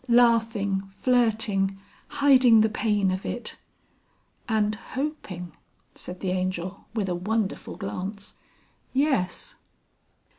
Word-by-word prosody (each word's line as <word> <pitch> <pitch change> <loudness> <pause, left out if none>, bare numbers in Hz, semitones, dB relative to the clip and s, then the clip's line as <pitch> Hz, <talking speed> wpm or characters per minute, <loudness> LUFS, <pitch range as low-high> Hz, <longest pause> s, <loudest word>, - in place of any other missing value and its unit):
Laughing, 225 -5 +3
flirting, 215 -3 +1 0.3
hiding 255 -5 +6
the 220 - +3
pain 210 -3 +1
of 185 +1 -3
it...." 240 - -5 0.9
"And 215 -1 +2
hoping," 220 - -5 0.4
said 180 +1 -8
the 185 - -1
Angel 185 0 -3
with 210 -4 0
a 180 - 0
wonderful 205 +3 -2
glance. 195 +1 -5 0.6
"Yes." 270 - 0
210 Hz, 100 wpm, -26 LUFS, 190-235 Hz, 0.9 s, hiding